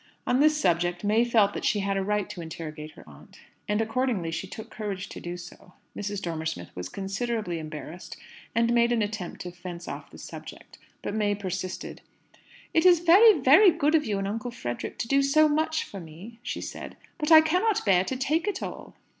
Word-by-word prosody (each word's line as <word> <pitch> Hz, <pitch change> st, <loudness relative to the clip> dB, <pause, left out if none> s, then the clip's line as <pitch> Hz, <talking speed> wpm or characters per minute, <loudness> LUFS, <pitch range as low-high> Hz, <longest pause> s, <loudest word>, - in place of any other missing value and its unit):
On 250 Hz, -, +2 dB
this 305 Hz, +1 st, +4 dB
subject 175 Hz, -, +1 dB
May 215 Hz, +3 st, +3 dB
felt 220 Hz, -4 st, +3 dB
that -, -, -5 dB
she 205 Hz, -, +1 dB
had 195 Hz, 0 st, -1 dB
a 195 Hz, -, 0 dB
right 210 Hz, 0 st, 0 dB
to 175 Hz, -, -7 dB
interrogate 155 Hz, -2 st, -7 dB
her -, -, -15 dB
aunt; 70 Hz, -2 st, -16 dB, 0.3 s
and 210 Hz, +1 st, +1 dB
accordingly 225 Hz, -6 st, -1 dB
she 165 Hz, +4 st, -4 dB
took 220 Hz, +3 st, -9 dB
courage 200 Hz, -3 st, -5 dB
to -, -, -8 dB
do 175 Hz, +1 st, -5 dB
so. 180 Hz, +1 st, -13 dB, 0.2 s
Mrs. 205 Hz, -1 st, -4 dB
Dormer 160 Hz, -2 st, -3 dB
Smith 85 Hz, -, -5 dB
was 90 Hz, 0 st, -5 dB
considerably 195 Hz, -2 st, -3 dB
embarrassed, 155 Hz, +2 st, -8 dB, 0.4 s
and 230 Hz, +1 st, +3 dB
made 235 Hz, 0 st, +3 dB
an 230 Hz, -3 st, +2 dB
attempt 205 Hz, -4 st, -5 dB
to 180 Hz, -, -6 dB
fence 175 Hz, -1 st, -8 dB
off -, -, -7 dB
the -, -, -14 dB
subject. -, -, -11 dB, 0.2 s
But -, -, -3 dB
May 205 Hz, -1 st, +1 dB
persisted. 185 Hz, -2 st, -5 dB, 0.7 s
"It's 350 Hz, +2 st, +6 dB
very, 370 Hz, +3 st, +7 dB
very 310 Hz, +11 st, +7 dB
good 315 Hz, -3 st, +1 dB
of 315 Hz, -2 st, +4 dB
you 210 Hz, -3 st, -1 dB
and 195 Hz, 0 st, -2 dB
Uncle 225 Hz, +4 st, -3 dB
Frederick 120 Hz, -, -5 dB
to 230 Hz, -, -3 dB
do 275 Hz, +3 st, +3 dB
so 305 Hz, +3 st, +4 dB
much 315 Hz, +1 st, 0 dB
for 195 Hz, -, -9 dB
me," 180 Hz, +8 st, -11 dB
she -, -, -4 dB
said; -, -, -7 dB, 0.2 s
"but 300 Hz, +1 st, -1 dB
I 315 Hz, -1 st, +10 dB
can't 365 Hz, -, +1 dB
bear 185 Hz, -3 st, +4 dB
to 260 Hz, -, -3 dB
take 295 Hz, +8 st, 0 dB
it 415 Hz, -, -2 dB
all." -, -, -8 dB
210 Hz, 205 wpm, -27 LUFS, 180-265 Hz, 0.7 s, I